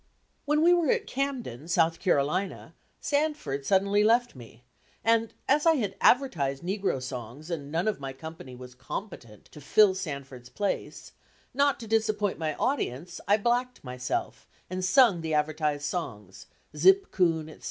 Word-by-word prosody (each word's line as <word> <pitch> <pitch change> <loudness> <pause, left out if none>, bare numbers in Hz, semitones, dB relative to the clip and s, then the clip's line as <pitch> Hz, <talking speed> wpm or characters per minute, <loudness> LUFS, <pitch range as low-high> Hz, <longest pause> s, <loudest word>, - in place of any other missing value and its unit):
When 300 +2 +2
we 350 +1 +6
were 340 -5 +2
at - - +1
Camden, 250 - -4
South 165 -1 +2
Carolina, 180 +3 -1 0.3
Sanford 285 - -1
suddenly 200 +1 +3
left 235 0 +3
me, 120 -1 -14 0.4
and 225 0 +2 0.2
as 295 +4 +3
I 325 - +7
had 205 -8 -2
advertised 155 - +2
negro 190 -5 -1
songs 130 +5 -7
and 145 -4 -5
none 170 +5 0
of 215 - 0
my 135 -1 -5
company 135 -2 -10
was 125 0 -11
competent 125 - -8
to 150 - -12
fill 195 +7 +5
Sanford's 140 -9 -7
place, 205 +6 -4 0.4
not 280 0 +2
to 225 - -8
disappoint 215 -3 0
my 155 -2 -2
audience, 175 - -2
I 205 +1 +5
blacked 245 +3 -1
myself 125 -1 -4 0.2
and 185 0 -3
sung 190 -1 +5
the 160 -1 -1
advertised 150 -1 0
songs, 110 - -5 0.3
"Zip 190 +6 +4
Coon," 165 -4 +1
etc. 155 - -12
175 Hz, 150 wpm, -27 LUFS, 140-220 Hz, 0.4 s, I